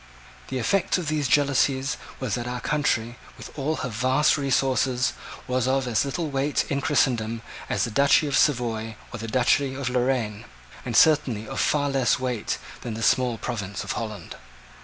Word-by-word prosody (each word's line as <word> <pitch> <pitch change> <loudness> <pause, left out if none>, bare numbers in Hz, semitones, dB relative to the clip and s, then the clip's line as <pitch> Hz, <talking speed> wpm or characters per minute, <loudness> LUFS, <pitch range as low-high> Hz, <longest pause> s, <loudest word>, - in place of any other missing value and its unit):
The 130 - -3
effect 180 - +1
of 170 -4 -3
these 150 -3 0
jealousies 140 0 +2 0.2
was 130 -6 -3
that 120 +1 -2
our 125 0 -3
country, 120 -5 0 0.2
with - - -10
all 150 +2 -1
her - - -3
vast 130 +6 +2
resources, 130 -2 +1 0.3
was 125 -1 0
of 135 -1 +1
as 115 -4 +2
little 155 +4 -2
weight 140 +2 0
in 140 0 0
Christendom 115 -6 +1 0.3
as - - 0
the 120 - -2
duchy 140 +6 +4
of 140 -2 -1
Savoy 115 -5 +1 0.2
or 120 - -5
the 115 - -5
duchy 130 +3 +2
of 135 -2 -2
Lorraine, 125 -4 -1 0.4
and 120 -3 0
certainly 135 -9 +4
of - - -5
far 145 -1 +2
less 135 -3 +2
weight 125 -4 -2 0.2
than 115 -3 -5
the 115 - -4
small 125 0 +2
province 105 -5 -4
of 100 - -4
Holland. 110 -3 -5
130 Hz, 175 wpm, -25 LUFS, 115-140 Hz, 0.4 s, duchy